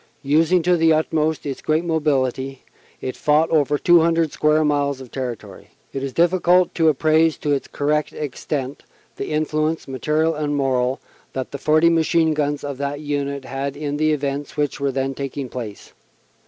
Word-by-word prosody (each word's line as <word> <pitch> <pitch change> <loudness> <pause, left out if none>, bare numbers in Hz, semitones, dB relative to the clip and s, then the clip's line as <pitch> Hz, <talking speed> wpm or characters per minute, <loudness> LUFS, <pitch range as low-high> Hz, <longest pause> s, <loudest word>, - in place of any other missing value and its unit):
Using 160 +5 +3
to 180 +1 +3
the 165 0 +4
utmost 155 0 0
its 140 -2 -4
great 155 +2 0
mobility, 135 -4 -1 0.4
it 130 - -4
fought 155 +1 +2
over 145 -2 +2
200 165 -1 +3
square 150 +1 +2
miles 140 -2 0
of 130 -3 -11
territory. 125 -4 -6 0.3
It 135 - -3
is 135 0 -3
difficult 175 +2 +3
to 160 -2 +3
appraise 155 +2 +3
to 150 - -2
its 140 -2 0
correct 150 +1 -1
extent 140 -1 -4 0.4
the - - -4
influence, 155 +1 -1
material 155 +4 0
and 150 -1 -2
moral, 130 -2 0 0.3
that 130 -1 -4
the 140 - -6
40 155 +3 +4
machine 165 -1 +2
guns 145 -1 -1
of 140 -2 -5
that 140 0 -3
Unit 140 -2 -3
had 135 +1 -4
in 145 -1 -3
the 155 +1 +2
events 140 -1 -3
which 145 -1 -1
were 140 0 0
then 135 +1 -2
taking 135 -1 -5
place. 115 -5 -8
145 Hz, 170 wpm, -21 LUFS, 140-155 Hz, 0.4 s, the